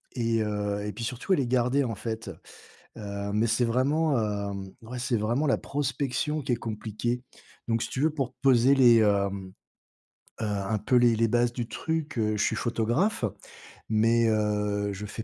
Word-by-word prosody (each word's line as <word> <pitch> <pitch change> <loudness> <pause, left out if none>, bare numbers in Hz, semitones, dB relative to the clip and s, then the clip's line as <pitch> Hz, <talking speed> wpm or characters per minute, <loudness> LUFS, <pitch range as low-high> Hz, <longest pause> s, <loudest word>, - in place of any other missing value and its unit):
Et 115 -2 +1
heu 105 -1 -2
et 105 - -4
puis 115 +4 -6
surtout 125 +10 -1
à - - +6
les 135 -7 0
garder, 125 +3 +2
en 115 -4 -3
fait, 110 -1 -5 0.7
heu, 100 -1 -5
mais, 110 +2 +2
c'est 120 +2 +2
vraiment, 140 +6 +1
heu, 105 -2 -1 0.3
ouais, 125 +3 -7
c'est 120 -1 0
vraiment 120 +8 0
la 135 - +3
prospection 145 +2 -2
qui 125 -2 -1
est - - +3
compliquée. 115 +2 -3 0.5
Donc, 115 -1 +1
si - - -5
tu - - -4
veux 155 - +3
pour 135 -5 -2
te - - -45
poser 130 -1 +5
les 120 -3 +7
hem, 100 -3 +1 0.9
heu, - - -1
un 105 0 -1
peu 115 +5 +1
les 120 -1 +5
les 115 0 +2
bases 120 +1 +2
du 120 -1 -4
truc, 160 -2 -3
heu, 110 -1 +1
je 105 - 0
suis - - +1
photographe 120 - 0 0.7
mais, 115 +1 +3
heu, 105 -1 0
je 100 +2 -6
fais 110 - -6
115 Hz, 190 wpm, -27 LUFS, 105-125 Hz, 0.9 s, les